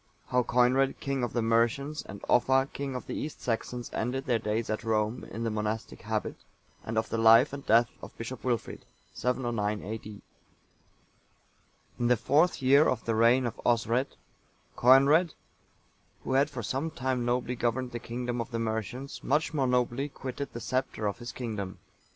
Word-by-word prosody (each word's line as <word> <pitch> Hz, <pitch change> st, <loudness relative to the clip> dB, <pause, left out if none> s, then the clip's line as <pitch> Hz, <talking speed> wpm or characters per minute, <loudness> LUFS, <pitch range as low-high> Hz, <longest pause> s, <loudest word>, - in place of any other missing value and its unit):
How 125 Hz, -, +3 dB
Coinred, 125 Hz, +3 st, +2 dB
king 140 Hz, -1 st, -2 dB
of 120 Hz, -, -2 dB
the 120 Hz, -, 0 dB
Mercians, 120 Hz, +6 st, +1 dB
and 100 Hz, -, -10 dB
Offa, 130 Hz, +2 st, +3 dB
king 140 Hz, -2 st, -4 dB
of 125 Hz, -, -5 dB
the -, -, -5 dB
East 155 Hz, -, -5 dB
Saxons, 120 Hz, +1 st, -3 dB
ended 130 Hz, +4 st, -2 dB
their 120 Hz, -3 st, +1 dB
days 110 Hz, +1 st, -1 dB
at 110 Hz, -, -3 dB
Rome, 110 Hz, +1 st, 0 dB
in 115 Hz, +3 st, -5 dB
the 115 Hz, -, -1 dB
monastic 105 Hz, +1 st, -3 dB
habit; -, -, -3 dB, 0.5 s
and 110 Hz, 0 st, -4 dB
of 110 Hz, 0 st, 0 dB
the 115 Hz, -, -1 dB
life 115 Hz, +5 st, +6 dB
and 140 Hz, -1 st, -6 dB
death 115 Hz, +2 st, +5 dB
of -, -, -11 dB
Bishop 115 Hz, +2 st, -6 dB
Wilfrid. 120 Hz, -4 st, -2 dB, 0.3 s
[709 120 Hz, -5 st, -1 dB
A.D.] 105 Hz, 0 st, -7 dB, 1.8 s
In 120 Hz, -, +1 dB
the 125 Hz, 0 st, +4 dB
fourth 150 Hz, -, +2 dB
year 140 Hz, +4 st, +6 dB
of 125 Hz, -3 st, -2 dB
the 115 Hz, -, 0 dB
reign 120 Hz, +3 st, +4 dB
of 120 Hz, -, -3 dB
Osred,(883) 120 Hz, +3 st, 0 dB, 0.6 s
Coenred,(884) 140 Hz, +7 st, +5 dB, 0.9 s
who -, -, -2 dB
had 140 Hz, +2 st, +3 dB
for 125 Hz, -5 st, -6 dB
some 135 Hz, +9 st, -2 dB
time 130 Hz, -5 st, -2 dB
nobly 125 Hz, +1 st, 0 dB
governed 120 Hz, +1 st, -1 dB
the 120 Hz, -, -4 dB
kingdom 120 Hz, +1 st, -3 dB
of 115 Hz, -, -6 dB
the 115 Hz, -, -3 dB
Mercians, 115 Hz, +4 st, -4 dB
much 150 Hz, +2 st, +1 dB
more 135 Hz, -4 st, +1 dB
nobly 125 Hz, +3 st, 0 dB
quitted 135 Hz, 0 st, -6 dB
the 120 Hz, -, -6 dB
sceptre 130 Hz, -3 st, -2 dB
of 100 Hz, +3 st, -2 dB
his 120 Hz, 0 st, -6 dB
kingdom. 105 Hz, -6 st, -5 dB
120 Hz, 175 wpm, -29 LUFS, 115-130 Hz, 1.8 s, life